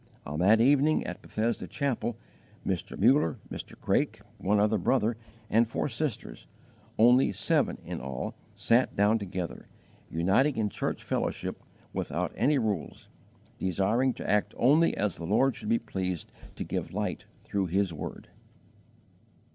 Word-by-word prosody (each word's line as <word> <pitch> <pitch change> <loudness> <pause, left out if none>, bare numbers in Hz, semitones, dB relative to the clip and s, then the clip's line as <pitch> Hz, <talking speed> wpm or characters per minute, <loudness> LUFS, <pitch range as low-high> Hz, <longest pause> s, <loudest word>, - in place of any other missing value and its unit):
On 75 +2 -4
that 105 +5 +5
evening 145 +5 +4
at 90 - -6
Bethesda 115 +2 -2
Chapel 125 -5 -2 0.5
Mr. 95 -3 -2
Muller, 115 - +4
Mr. - - -8
Craik, - - 0 0.2
one 105 +2 +2
other 105 +1 +3
brother, 115 +3 +2 0.3
and 115 +2 +3
four - - -1
sisters 130 0 -4 0.5
only 120 +3 +6
seven 100 0 +1
in - - -5
all 65 -1 -4 0.2
sat 120 +3 +2
down 105 +3 +3
together, 90 -3 -5 0.4
uniting 95 - +2
in 105 -2 +1
church - - -3
fellowship - - -2
_"without - - -5
any 145 0 +3
rules, 105 - -3 0.5
desiring 100 +8 +1
to - - -6
act 105 0 +1
only 150 +7 +4
as 105 -4 0
the 85 - -6
Lord 125 +6 +3
should 105 - -6
be 115 - +4
pleased 95 -6 -4 0.2
to - - -4
give - - -4
light - - -2 0.2
through 100 -2 -1
His 95 0 +1
word." 75 - -7
105 Hz, 140 wpm, -29 LUFS, 95-125 Hz, 0.5 s, only